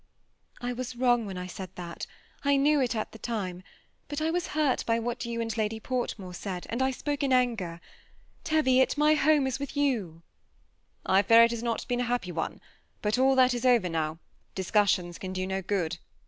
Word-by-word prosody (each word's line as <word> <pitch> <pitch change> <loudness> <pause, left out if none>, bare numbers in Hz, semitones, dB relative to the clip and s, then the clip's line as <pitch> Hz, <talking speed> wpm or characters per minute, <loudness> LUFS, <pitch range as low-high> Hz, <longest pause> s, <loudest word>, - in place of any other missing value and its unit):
I 245 0 -2
was 250 0 -5
wrong 240 -2 +2
whoi 190 -2 -6
I 180 - -5
said 185 +1 -7
that, 175 -1 -6 0.2
— - - -31
I 280 0 +3
knew 290 +1 +3
it 245 -2 0
at 215 - -3
tlie 220 - -13
time; 190 -6 -3 0.5
bat~I 310 +2 -1
was 350 0 -1
hurt 295 -4 +2
b7 230 0 +1
what 240 +1 -3
jou 235 -1 -3
and 225 -1 -2
JjaAj 220 0 -1
Portmore 225 -7 -3
said, 180 0 -5
and 235 +3 -1
I 265 - +3
spoke 285 +2 -3
in 275 -2 +1
anger. 225 -10 +1 0.6
Teyiot, 260 -5 +3
nrjr 300 +1 +4
home 300 -1 +4
is 265 0 -2
with 280 -1 -5
700." 255 - 0
^ 165 - -19 0.8
I 190 +1 +4
fear 230 +3 +7
it 230 - +4
has 235 -1 -3
not 235 -1 -2
been 245 -1 0
a - - 0
happ7 240 -7 -2
one, 160 -1 -3 0.4
bat 210 +4 +1
all 265 +1 +4
that 255 -1 +5
is 240 0 -3
over 240 -8 +4
now; 160 -1 -2 0.4
discussions 190 -2 +1
can 185 -1 -5
do 185 0 -2
no 190 0 -2
good. 175 -3 -2
235 Hz, 205 wpm, -28 LUFS, 190-260 Hz, 0.8 s, fear